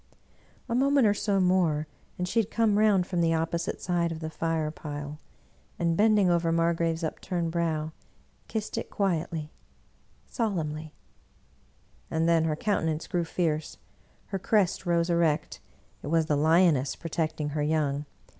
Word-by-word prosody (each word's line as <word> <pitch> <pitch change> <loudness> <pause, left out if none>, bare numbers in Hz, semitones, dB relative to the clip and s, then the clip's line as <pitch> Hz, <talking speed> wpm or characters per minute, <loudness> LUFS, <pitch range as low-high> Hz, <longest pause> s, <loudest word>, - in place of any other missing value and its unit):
A 230 - -2
moment 275 +1 +4
or 205 - +5
so 205 -1 0
more 180 -5 +2 0.3
and 180 - -2
she 230 - +1
had 220 -2 0
come 220 -3 +2
round 205 -4 +4
from 175 -2 -1
the 165 -1 +3
opposite 165 +1 -2
side 175 -2 0
of 160 - -5
the 160 -1 -5
fire 160 -2 -1
pile, 145 -1 -7 0.6
and 170 -1 +1
bending 210 0 +4
over 170 -1 +2
Margrave's 165 0 +1
upturned 165 +1 -2
brow, 160 -2 -1 0.6
kissed 215 -1 -3
it - - -7
quietly, 165 -5 -1 0.7
solemnly; 160 - -3 1.1
and 160 +1 0
then 165 -1 +3
her 155 -1 0
countenance 160 -4 -1
grew 175 -3 -1
fierce, 160 -2 -2 0.5
her 195 - -2
crest 190 -2 +1
rose 170 0 +2
erect: 165 -3 +1 0.4
it - - -7
was 165 +1 +2
the 150 - +1
lioness 155 -3 +3
protecting 155 -2 -2
her 150 +1 -2
young. 150 -1 0
165 Hz, 145 wpm, -28 LUFS, 155-185 Hz, 1.1 s, or